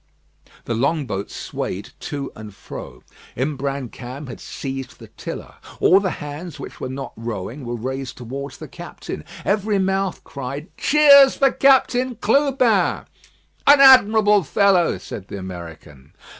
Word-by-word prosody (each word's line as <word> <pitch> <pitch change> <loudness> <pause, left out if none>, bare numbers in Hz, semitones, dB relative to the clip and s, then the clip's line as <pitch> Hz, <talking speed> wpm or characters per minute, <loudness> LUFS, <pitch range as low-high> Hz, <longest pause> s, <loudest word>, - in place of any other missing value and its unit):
The 120 - -2
long 140 +6 0
boat 100 -4 -4
swayed - - -5 0.2
to 140 -1 -4
and 105 -2 -10
fro. 65 -8 -10 0.3
Imbrancam 135 -1 -4
had - - -9
seized 135 -2 -6
the - - -13
tiller. - - -8 0.3
All 190 - +6
the 195 -2 -1
hands 150 +3 -7
which - - -9
were - - -3
not 135 +1 -6
rowing 115 +3 -6
were 120 0 -3
raised 130 +2 -5
towards 135 +2 -7
the - - -9
captain - - -8 0.2
every 205 +1 +1
mouth 195 -1 -1
cried, 140 +4 -7
"Cheers 280 -2 +6
for 275 -1 +3
Captain 255 -2 +3
Clubin." 245 -5 +2 0.6
"An 285 0 +8
admirable 220 -6 +7
fellow!" 190 0 +2
said 100 -3 -9
the - - -7
American. 80 -7 -10
140 Hz, 135 wpm, -21 LUFS, -, 0.6 s, An